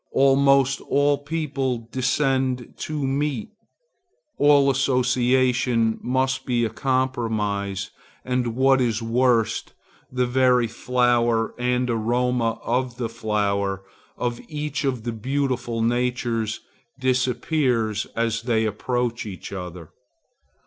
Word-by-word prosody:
Almost 135 0 +4
all 145 0 +3
people 135 -6 -3
descend 130 -1 0
to 150 -3 -3
meet. 135 -3 -1 0.9
All 145 -1 +5
association 125 -3 +2
must 130 +1 0
be 120 -2 +1
a 110 - -3
compromise, 110 -7 -1 0.3
and, 125 -2 -1
what 135 +1 +4
is 115 -2 0
worst, 115 -1 +1 0.4
the 125 0 +1
very 125 -1 +3
flower 120 -1 +1
and 125 0 +1
aroma 120 0 0
of 125 0 -1
the 120 -3 -2
flower 100 -3 -1 0.3
of 120 -1 -2
each 150 0 -3
of 125 -4 -1
the 120 - -2
beautiful 125 -1 -1
natures 120 -2 -1 0.4
disappears 125 -3 0
as 115 0 0
they 115 -2 +1
approach 120 +2 -2
each 95 -1 -8
other. 90 -3 -7
125 Hz, 105 wpm, -23 LUFS, 115-130 Hz, 0.9 s, All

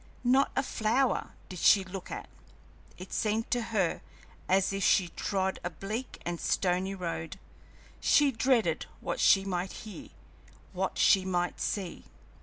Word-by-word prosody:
Not 260 +3 +3
a 270 - +2
flower 240 +2 0
did 185 - -8
she 195 +3 +6
look 190 0 -8
at. - - -6 0.7
It 185 +1 -9
seemed 220 +1 -1
to 245 - +2
her 215 -6 -1 0.5
as 190 +1 +3
if 195 0 -2
she 185 -3 +4
trod 190 +3 -2
a 175 - -1
bleak 215 +9 -6
and 175 -1 -3
stony 185 +1 0
road. 170 -1 -4 0.6
She 290 -1 +4
dreaded 250 0 +1
what - - -3
she 195 -1 +5
might 185 -1 -2
hear, 215 - -9 0.6
what - - -2
she 195 -3 +5
might 180 -1 -1
see. 190 -5 -3
195 Hz, 145 wpm, -30 LUFS, 180-225 Hz, 0.7 s, she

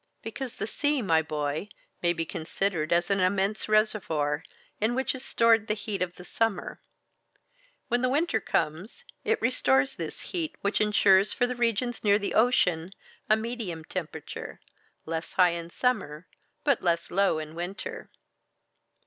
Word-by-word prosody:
"Because 245 +2 -5
the - - -3
sea, 290 +3 0
my 165 -4 +4
boy, 150 +4 -3 0.3
may 175 - +3
be 165 -1 -2
considered 160 0 -2
as 175 +2 +2
an 195 - +2
immense 195 +3 +1
reservoir, 165 -9 +1 0.4
in 220 +3 +1
which 265 +1 0
is 260 -1 -6
stored 230 -3 +3
the 215 - +1
heat 205 -2 -4
of 180 -1 -1
the 180 - -11
summer. 225 -4 -1 1.1
When 245 +1 +1
winter 290 -3 +1
comes, 195 - -2 0.2
it 450 0 +1
restores 135 - +2
this 165 -2 -4
heat, 335 -4 -4
which 200 +2 +1
insures 200 -1 +4
for 245 - +2
the 250 - -2
regions 240 0 0
near 205 -1 +5
the 205 - -3
ocean 190 -7 +2 0.4
a 215 - +7
medium 220 -8 -4
temperature, 160 -4 -6 0.5
less 160 +1 -4
high 180 -1 +5
in 170 0 -5
summer, 180 - -1 0.4
but 280 -5 +2
less 170 -1 0
low 195 -3 +3
in 155 0 -6
winter." 175 +5 -6
200 Hz, 150 wpm, -28 LUFS, 165-230 Hz, 1.1 s, a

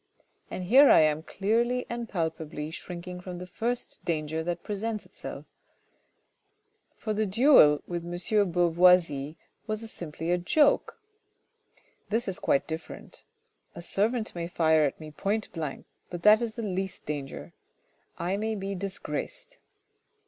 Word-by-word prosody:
And 185 - -5
here 265 +10 +7
am 155 -1 +6
I 160 - -14
clearly 235 +5 +1
and 235 -1 -5
palpably 160 -3 -3
shrinking 180 +1 -7
from 180 -1 -7
the 180 - -7
first 235 +7 -4
danger 160 -1 -2
that 170 +1 -3
presents 215 +1 -3
itself; - - -9 1.5
for 215 - -3
the 215 0 0
duel 195 - +6
with 175 -1 -4
M. 170 - -7
de 205 +4 +2
Beauvoisis 170 -4 +3 0.3
was 215 +1 -4
simply 165 0 -5
a 180 - +2
joke. 290 - +2 1.1
This 225 +3 0
is 190 0 -2
quite 140 - +2
different. 160 0 -8 0.5
A - - -7
servant 220 +5 0
may 170 -1 -4
fire 160 -3 +3
at 140 - -3
me 155 -1 -9
point 205 +7 -2
blank, 155 -5 -5 0.2
but 175 -1 -7
that 215 +2 +7
is 230 -2 -2
the 230 - -5
least 190 -2 -3
danger; 145 -2 -6 0.6
I 180 +3 -1
may 220 +1 -2
be 195 0 -4
disgraced. - - -5
180 Hz, 140 wpm, -28 LUFS, 165-220 Hz, 1.5 s, here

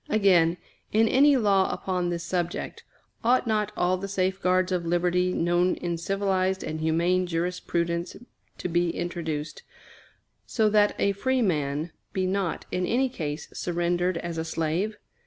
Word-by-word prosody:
Again, 180 -5 +4 0.3
in 220 +1 +4
any 280 +4 +5
law 200 -5 +3
upon 180 -2 -2
this 170 -1 -3
subject, 175 0 -3 0.4
ought 250 +3 +3
not 210 -2 0
all 180 +1 +2
the 195 +2 -5
safeguards 185 -1 +1
of 180 -2 0
liberty 175 +1 +1
known 175 +1 +2
in 175 -1 -3
civilized 190 +1 0
and 155 - -4
humane 170 +3 +1
jurisprudence 170 0 -2 0.4
to - - -3
be 175 0 +1
introduced, 160 -3 -4 0.9
so 220 -2 +2
that 210 -1 +3
a 200 - +2
free 255 +5 0
man 150 -3 -1 0.2
be 190 -1 0
not, 185 -3 -1
in 180 0 -1
any 260 +3 +2
case, 150 -9 -5
surrendered 175 +1 0
as 165 -1 -4
a - - -1
slave? 165 +6 -2
180 Hz, 145 wpm, -26 LUFS, 170-195 Hz, 0.9 s, any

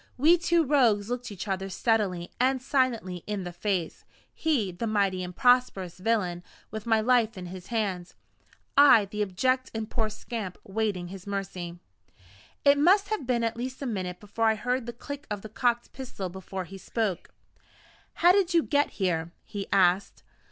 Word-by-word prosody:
We 310 +7 +6
two 340 -1 +2
Rogues 240 -7 +3
looked 245 -2 -3
each 200 +1 -6
other 195 0 -2
steadily 190 -4 0
and 260 +1 +3
silently 255 -8 0
in 205 -2 -2
the 175 - -5
face 175 -2 -2 0.3
he, 265 -12 0
the 205 +7 -4
mighty 200 -3 +1
and 180 0 -7
prosperous 225 -8 +2
villain, 185 -4 0 0.3
with 220 +1 -6
my 225 -1 +4
life 230 -2 +2
in 180 - -6
his 180 0 -9
hands: 195 -6 -2 0.6
I, 280 -7 +7
the 210 +2 -5
abject 255 +7 0
and 220 -1 -3
poor 220 -2 0
scamp, 215 -3 -6
waiting 195 -3 -2
his 190 0 -10
mercy. 190 -3 -4 0.9
It 285 0 +6
must 390 +7 +4
have 430 - -2
been 240 -2 +1
at 230 0 0
least 255 +3 -5
a - - -3
minute 185 -7 -3
after 210 +2 -8
I 220 -1 +4
heard 250 +2 -2
the 240 - -4
click 285 +4 -8
of 205 -2 -4
the 220 - -8
cocked 240 +3 0
pistol 255 -8 -6
before 190 +1 -6
he 195 +2 -10
spoke. 210 -3 -2 1.0
"How 350 - +10
did 370 -2 +2
you 335 - +5
get 290 0 +2
here?" 170 -4 0
he 200 -1 -6
asked. 190 0 +2
215 Hz, 175 wpm, -27 LUFS, 190-250 Hz, 1.0 s, How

